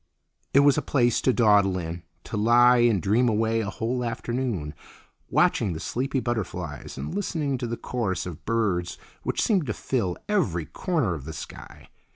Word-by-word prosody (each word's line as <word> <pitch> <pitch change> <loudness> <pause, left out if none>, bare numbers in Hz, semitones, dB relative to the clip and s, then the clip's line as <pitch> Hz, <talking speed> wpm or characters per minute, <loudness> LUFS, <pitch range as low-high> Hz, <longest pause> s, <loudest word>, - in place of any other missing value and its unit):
It 140 - +6
was 145 -1 +5
a - - -3
place 120 -4 +2
to 130 - +3
dawdle 105 -6 +4
in, 85 0 -5 0.2
to - - -6
lie 120 +3 +5
and 120 -4 +4
dream 110 +8 +2
away 110 +1 +1
a 100 - -3
whole 120 +5 -2
afternoon, 115 - -3 0.6
watching 95 - +2
the 80 - -5
sleepy 135 - -2
butterflies 90 - -4
and 70 - -5
listening 155 -9 -2
to 120 - -3
the 115 0 -3
chorus 100 -8 -2
of 90 -4 -8
birds 100 -7 0 0.2
which - - -1
seemed 190 - +2
to 110 - -1
fill 105 -9 -1
every 100 - 0
corner 155 - -1
of 75 -5 -7
the 80 - -6
sky. - - -10
115 Hz, 175 wpm, -25 LUFS, 90-125 Hz, 0.6 s, It